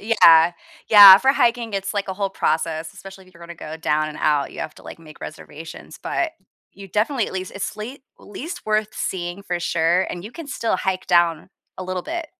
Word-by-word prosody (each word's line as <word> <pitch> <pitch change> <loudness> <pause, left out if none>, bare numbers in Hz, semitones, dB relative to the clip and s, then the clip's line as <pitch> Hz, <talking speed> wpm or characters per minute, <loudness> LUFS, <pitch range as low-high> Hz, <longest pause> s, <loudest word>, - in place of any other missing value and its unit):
yeah. 170 -6 +5 0.4
Yeah, 200 -3 +10
for 265 +3 +3
hiking, 235 -3 0
it's, 195 +1 -3
like, 200 -1 -3
a 190 - -3
whole 195 0 -2
process, 160 -3 -2
especially 195 -1 -13
if 185 - -22
you're 170 - -18
gonna 170 0 -10
go 155 0 -8
down 155 -1 -1
and 150 - -9
out, 145 -2 0
you - - -8
have 155 - -6
to, - - -16
like, - - -10
make 155 -2 -15
reservations, 160 +1 -10
but 335 - -2 0.4
you 195 +1 -12
definitely, 220 +5 0
at - - -8
least 185 -1 -5
it's 200 - -5
late 245 +6 -8 0.2
least 305 - -9
worth 215 0 0
seeing 175 +1 -4
for 175 -2 -3
sure, 170 +2 +1
and 175 - -6
you 215 - -8
can 330 -3 -9
still 230 -7 -2
hike 185 0 -3
down 170 -2 +1 0.3
a 185 - -6
little 185 -1 -4
bit. 335 - -5
185 Hz, 215 wpm, -21 LUFS, 165-215 Hz, 0.4 s, Yeah